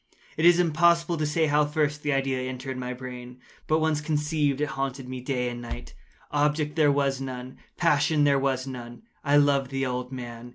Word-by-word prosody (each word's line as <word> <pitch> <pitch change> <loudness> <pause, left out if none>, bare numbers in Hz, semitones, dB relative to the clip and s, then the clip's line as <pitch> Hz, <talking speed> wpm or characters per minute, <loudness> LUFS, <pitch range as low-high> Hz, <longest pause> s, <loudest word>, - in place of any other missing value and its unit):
It 160 - 0
is 175 0 +6
impossible 170 0 +3
to 155 -1 0
say 160 +2 +2
how 150 0 +3
first 150 0 0
the 145 - -1
idea 135 -1 0
entered 130 +1 -5
my 125 0 -4
brain; 125 -1 -8 0.3
but 155 - +3
once 155 -1 +1
conceived, 150 -2 0
it 150 - 0
haunted 135 -1 -4
me 130 0 -6
day 125 -1 -1
and 120 0 -5
night. 60 - -7 0.4
Object 150 +1 +1
there 150 -3 +4
was 140 -1 0
none. 130 -1 -6 0.2
Passion 150 -2 +3
there 140 -1 +4
was 135 -1 0
none. 120 - -8 0.2
I 145 0 +4
loved 140 -2 +3
the 135 0 -1
old 125 0 -3
man. 120 -2 -7
140 Hz, 195 wpm, -26 LUFS, 130-150 Hz, 0.4 s, is